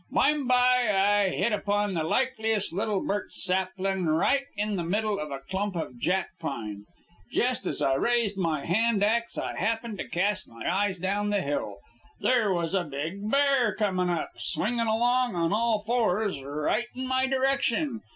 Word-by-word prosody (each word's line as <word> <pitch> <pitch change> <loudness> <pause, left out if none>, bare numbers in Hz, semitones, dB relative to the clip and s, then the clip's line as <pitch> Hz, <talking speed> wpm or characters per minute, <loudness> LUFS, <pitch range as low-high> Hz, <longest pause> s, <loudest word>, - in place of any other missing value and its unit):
"Bime 295 -3 +2
by 250 -1 +4 0.4
I - - +1
hit 215 +4 0
upon 205 -1 0
the 165 -3 0
likeliest 220 -1 0
little 205 +1 -1
birch 205 -1 -2
saplin', 190 -1 -1
right 270 - +2
in 210 0 -1
the 175 - -2
middle 205 +4 0
of 150 - -4
a 140 - -4
clump 190 +6 -3
of 145 -7 -5
jack 185 +5 0
pine. 110 -9 -5 0.5
Jest - - 0
as - - -2
I 135 - +3
raised 225 - +1
my 165 -6 -1
hand 215 +3 +2
ax 230 +2 +1
I - - -3
happened 225 -2 -2
to - - -4
cast 195 +3 -1
my 115 0 -10
eyes 190 +1 +1
down 200 +3 -1
the 205 -1 +1
hill. 140 -8 -2 0.4
There 235 -5 +2
was 170 -1 -1
a 190 -2 +2
big 165 +8 -4
bear 275 -6 +3
comin' 185 -4 0
up, 170 -2 -2
swingin' 230 +2 -1
along 240 +1 +2
on 170 +1 +1
all 220 -1 +1
fours, 215 - +1
right 150 - -1
in 260 +1 -4
my 260 0 +1
direction. 270 -1 0
205 Hz, 170 wpm, -27 LUFS, 175-235 Hz, 0.5 s, by